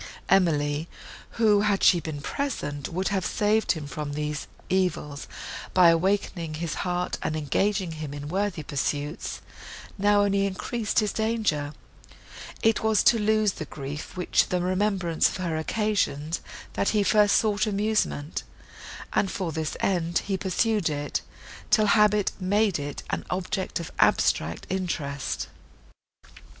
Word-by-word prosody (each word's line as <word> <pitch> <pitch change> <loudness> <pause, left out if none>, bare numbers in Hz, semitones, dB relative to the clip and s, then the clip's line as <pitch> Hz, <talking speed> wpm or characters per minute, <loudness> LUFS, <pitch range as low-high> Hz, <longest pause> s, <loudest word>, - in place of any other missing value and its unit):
Emily, 155 -4 +2 0.5
who, 215 -3 +5
had 205 -2 +1
she 175 - +6
been 155 -3 -5
present, 150 - -3
would 185 +3 -1
have 195 -3 0
saved 215 +2 +2
him 160 -4 -6
from 145 0 -5
these 150 0 -3 0.2
evils 180 -6 -1 0.5
by 180 -2 +8
awakening 170 -2 0
his 165 0 -3
heart, 180 -1 -2
and 155 - -1
engaging 185 +5 0
him 155 -2 -6
in 145 0 -6
worthy 190 -1 -1
pursuits, 145 +2 -3 0.6
now 205 +1 +4
only 200 0 +2
increased 215 +3 -1
his 210 - -1
danger;—it 215 -10 0 1.1
was 220 -3 +3
to 230 - +5
lose 215 -1 +3
the 155 - -6
grief, 145 +4 -7
which 180 - +2
the 180 - +1
remembrance 185 -2 +1
of - - -5
her 175 -3 -2
occasioned, 165 -4 0 0.3
that - - +1
he 210 -2 +2
first 205 0 +4
sought 215 -1 +2
amusement; 205 -7 0 0.7
and 195 - +2
for 185 -4 -3
this 155 0 -3
end 175 -3 +1
he 195 - 0
pursued 195 0 +1
it, 145 -2 -2 0.5
till 215 0 +5
habit 210 -1 +4
made 200 -1 +2
it 145 0 -5
an - - -2
object 185 0 -2
of 170 - -6
abstract 85 +2 +2
interest. 155 -7 -3
185 Hz, 135 wpm, -26 LUFS, 155-205 Hz, 1.1 s, by